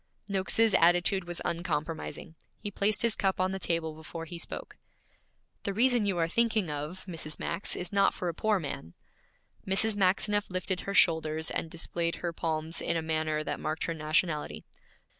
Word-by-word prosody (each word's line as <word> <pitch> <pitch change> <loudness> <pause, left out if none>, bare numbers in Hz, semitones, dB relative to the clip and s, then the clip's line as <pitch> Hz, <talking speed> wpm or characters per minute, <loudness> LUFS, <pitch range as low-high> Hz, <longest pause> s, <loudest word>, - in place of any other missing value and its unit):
Noakes's 200 +3 +3
attitude 175 +2 +4
was 175 0 -4
uncompromising. 165 -1 -3 0.2
He 205 - -5
placed 205 +3 0
his 235 -2 +4
cup 190 -2 0
on 185 0 +2
the 190 - -3
table 165 -3 0
before 160 +1 -7
he 170 +1 -7
spoke. - - -6 0.8
'The 200 - -2
reason 240 -2 +3
you 190 -3 +1
are 165 -1 +2
thinking 220 -3 +1
of, 150 +6 -5
Mrs. 160 -4 -3
Max, 170 +4 -1
is 180 +2 -4
not 200 0 +4
for 180 - -3
a 170 - -1
poor 215 +3 +1
man.' 135 - -6 0.7
Mrs. 205 +3 +3
Maxineff 205 +2 +2
lifted 185 0 -1
her 200 - -4
shoulders 160 -1 +3
and 165 - -2
displayed 170 0 -2
her 170 -1 -3
palms 160 0 -2
in - - 0
a 165 - -2
manner 155 -1 0
that - - -3
marked 155 +1 -2
her 165 - -1
nationality. 155 0 0
175 Hz, 175 wpm, -30 LUFS, 160-195 Hz, 0.8 s, attitude